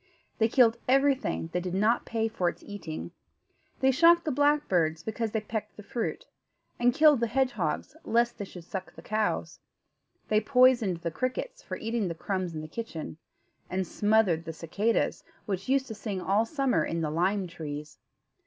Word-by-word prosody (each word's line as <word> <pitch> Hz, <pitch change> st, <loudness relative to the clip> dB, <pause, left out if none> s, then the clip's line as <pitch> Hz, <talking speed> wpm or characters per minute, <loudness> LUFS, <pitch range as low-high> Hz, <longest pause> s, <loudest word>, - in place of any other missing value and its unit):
They 225 Hz, -, +4 dB
killed 235 Hz, -1 st, +4 dB
everything 270 Hz, -10 st, +2 dB
that 180 Hz, -, 0 dB
did 180 Hz, 0 st, -3 dB
not 215 Hz, +5 st, +2 dB
pay 225 Hz, -1 st, 0 dB
for 185 Hz, -5 st, 0 dB
its -, -, -10 dB
eating. 175 Hz, -5 st, -7 dB, 0.7 s
They 265 Hz, 0 st, +5 dB
shot 335 Hz, +5 st, +6 dB
the 310 Hz, -, 0 dB
blackbirds, 220 Hz, -, +2 dB
because 220 Hz, +2 st, -2 dB
they 220 Hz, 0 st, -1 dB
pecked 215 Hz, 0 st, -5 dB
the 210 Hz, -, -9 dB
fruit; 230 Hz, +3 st, -3 dB, 0.5 s
and 245 Hz, +1 st, +4 dB
killed 300 Hz, 0 st, +5 dB
the 235 Hz, -, +1 dB
hedgehogs, 235 Hz, -, -1 dB
lest 235 Hz, +1 st, +1 dB
they 205 Hz, -, -3 dB
should 180 Hz, -2 st, -11 dB
suck 185 Hz, +2 st, -6 dB
the -, -, -12 dB
cows; 215 Hz, 0 st, -1 dB, 0.7 s
they 215 Hz, 0 st, +3 dB
poisoned 250 Hz, -10 st, +4 dB
the 170 Hz, -, -2 dB
crickets 255 Hz, -, -3 dB
for -, -, -6 dB
eating 225 Hz, -2 st, -1 dB
the 170 Hz, -, -4 dB
crumbs 185 Hz, -1 st, -3 dB
in 155 Hz, -, -4 dB
the 155 Hz, -, -7 dB
kitchen; 165 Hz, -5 st, -6 dB, 0.5 s
and 185 Hz, 0 st, -1 dB
smothered 205 Hz, -4 st, +2 dB
the 165 Hz, -, -5 dB
cicadas, 200 Hz, +8 st, 0 dB, 0.2 s
which 195 Hz, +2 st, -3 dB
used 270 Hz, 0 st, +3 dB
to 235 Hz, -, -7 dB
sing 205 Hz, -2 st, -4 dB
all 200 Hz, +5 st, +1 dB
summer 275 Hz, -3 st, +1 dB
in 165 Hz, 0 st, -2 dB
the 155 Hz, -2 st, -1 dB
lime 185 Hz, +5 st, +1 dB
trees. 150 Hz, -3 st, -7 dB
215 Hz, 175 wpm, -28 LUFS, 180-245 Hz, 0.7 s, shot